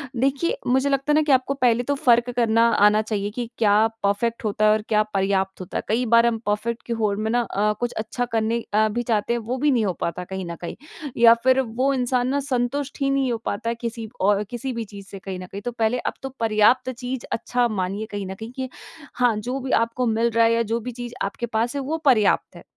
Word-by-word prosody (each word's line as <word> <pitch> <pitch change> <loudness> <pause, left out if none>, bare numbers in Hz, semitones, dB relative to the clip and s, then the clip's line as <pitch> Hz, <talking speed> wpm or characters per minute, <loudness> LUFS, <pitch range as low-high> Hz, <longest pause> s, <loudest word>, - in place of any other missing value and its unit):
देखिए 275 +7 0
मुझे 265 +3 +2
लगता 275 +1 0
है - - +4
ना 310 - +5
कि 295 - +1
आपको 260 +1 +3
पहले 245 -3 +2
तो 285 +3 -1
फ़र्क 240 -2 +3
करना 230 -1 +3 0.2
आना 210 +1 +3
चाहिए 210 -2 -2
कि 240 +1 -5
क्या 205 -3 +4 0.3
परफ़ेक्ट 225 +4 0
होता 215 +1 +1
है 215 - +6
और 215 0 +2
क्या 215 -1 +3
पर्याप्त 195 -2 -1
होता 185 - -5
है? - - -3
कई 235 +4 +1
बार 230 0 +5
हम 235 -1 +2
परफ़ेक्ट 225 +3 -2
की 235 - -2
होड़ 215 -3 0
में 220 +1 -1
ना 245 - +2
अ, 210 -2 0
कुछ 240 0 -1
अच्छा 225 +3 -2
करने 230 0 -1
अ, 215 +1 +4
भी 240 +3 -2
चाहते 225 0 0
हैं 240 - 0
वो 235 +3 -4
भी 290 +2 +2
नहीं 230 -4 +2
हो 185 - 0
पाता 180 +1 -3
कहीं 190 0 -5
न 170 - -5
कहीं 170 - -5 0.4
या 230 0 +8
फिर 260 0 +4
वो 255 +3 0
इंसान 250 -1 0
ना 280 +2 +1
संतुष्ट 270 +1 -2
ही 275 - +2
नहीं 270 -2 +1
हो 230 - -1
पाता 215 +3 -2
है 235 - -1
किसी 230 -2 -5
औ 205 +1 +4
अ, 210 - -1
किसी 245 +2 -4
भी 230 -1 -3
चीज़ 200 -1 -11
से 195 - -9
कहीं 190 -1 -6
न 185 - -7
कहीं। 200 - -6
तो 245 - -4
पहले 230 +1 0
अब - - -3
तो 270 - -3
पर्याप्त 225 +3 +3
चीज़ 250 +1 -5
अच्छा 245 +1 0
मानिए 200 0 -3
कहीं 205 -1 -4
न 190 - -5
कहीं 225 +3 -8
कि 260 -1 -4 0.5
हाँ, 245 -3 +2
जो 250 +5 -3
भी 260 0 -5
आपको 230 +2 +1
मिल 225 +1 +2
रहा 230 0 +4
है 230 - +3
या 230 - +2
जो 230 - +1
भी 245 +2 -6
चीज़ 240 0 -7
आपके 200 +4 -4
पास 230 +3 -1
है 280 - -1
वो 310 +5 -2
पर्याप्त 220 -7 +3
है। - - -12
230 Hz, 255 wpm, -23 LUFS, 215-250 Hz, 0.5 s, या